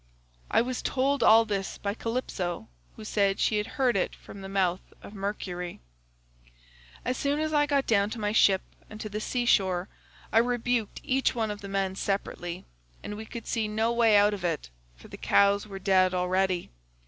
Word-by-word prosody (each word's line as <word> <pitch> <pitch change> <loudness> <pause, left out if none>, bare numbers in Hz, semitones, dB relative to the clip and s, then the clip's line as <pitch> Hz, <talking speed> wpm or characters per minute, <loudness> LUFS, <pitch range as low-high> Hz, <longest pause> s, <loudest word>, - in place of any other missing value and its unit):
"I - - +3
was 250 0 -3
told 275 0 0
all 225 0 +7
this 200 -3 -3
by 200 0 -2
Calypso, 200 - -3 0.3
who 215 - -10
said 200 -2 +1
she 215 - +2
had 210 - -1
heard 255 -4 +3
it 190 - 0
from 200 - -12
the 195 - -7
mouth 190 -2 +1 0.2
of - - -10
Mercury. 195 -3 -4 1.3
"As 250 0 -1
soon 285 +1 0
as 310 0 -1
I 295 -1 +3
got 280 -2 +1
down 205 -2 +2
to 225 - -6
my 210 -1 0
ship 195 -3 +4 0.3
and 215 - -10
to 215 - -5
the 210 +1 -4
sea 245 +2 -1
shore 190 -5 +2 0.4
I - - +6
rebuked 245 -2 0
each 265 0 +1
one 220 -2 -1
of 205 - -7
the 200 - -7
men 195 -1 -1
separately, 185 -3 -3 0.4
but - - -5
we 220 +1 -7
could 235 - -8
see 225 -2 -1
no 220 +2 0
way 230 -3 +5
out 205 +1 +4
of 195 -3 -6
it, 165 - -2 0.2
for - - -15
the - - -10
cows 200 +1 +3
were 195 -2 -7
dead 185 -1 +3
already. 180 0 0
205 Hz, 195 wpm, -28 LUFS, 195-230 Hz, 1.3 s, all